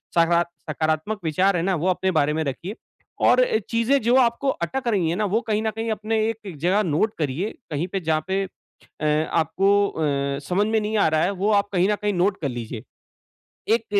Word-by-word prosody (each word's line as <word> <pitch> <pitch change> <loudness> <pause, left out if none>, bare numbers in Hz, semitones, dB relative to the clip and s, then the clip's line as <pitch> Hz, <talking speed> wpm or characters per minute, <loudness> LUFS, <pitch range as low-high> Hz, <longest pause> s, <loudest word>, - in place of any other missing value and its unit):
सकारात 170 0 +3 0.2
सकारात्मक 155 +7 -1
विचार 185 +5 +2
हैं 165 - -1
ना 190 0 +1
वो 170 +2 -1
अपने 190 +1 +1
बारे 150 0 +2
में 160 +1 -1
रखिए। 170 +8 -5 0.5
और - - +5
अ, - - +1
चीज़ें 235 +4 +2
जो 235 +3 +3
आपको 240 +3 +1
अटक 250 +5 -3
रही 195 -8 +1
है 170 - 0
ना, 210 +2 0
वो 210 +4 +1
कहीं 215 -3 -1
न 220 - 0
कहीं 225 0 -3
अपने 220 +1 -1
एक 210 -6 -6
जगह 185 +8 +2
नोट 180 +5 +1
करिए, 155 +6 -1 0.2
कहीं 155 +4 -1
पे 195 +1 -3
जहाँ 155 -3 0
पे 190 +1 0 0.4
अ, 155 +1 -1
आपको 195 +5 +2
अ, 140 -3 -1
समझ 200 +3 +2
में 220 0 +1
नहीं 215 +1 -2
आ 200 - +4
रहा 155 0 +2
है 180 - +2
वो 210 - +3
आप 200 - -7
कहीं 185 0 +2
न - - +3
कहीं 210 0 +1
नोट 190 +3 +1
कर 145 - -1
लीजिए। 120 -2 -6 0.9
एक 230 - -4
185 Hz, 215 wpm, -23 LUFS, 155-215 Hz, 0.9 s, और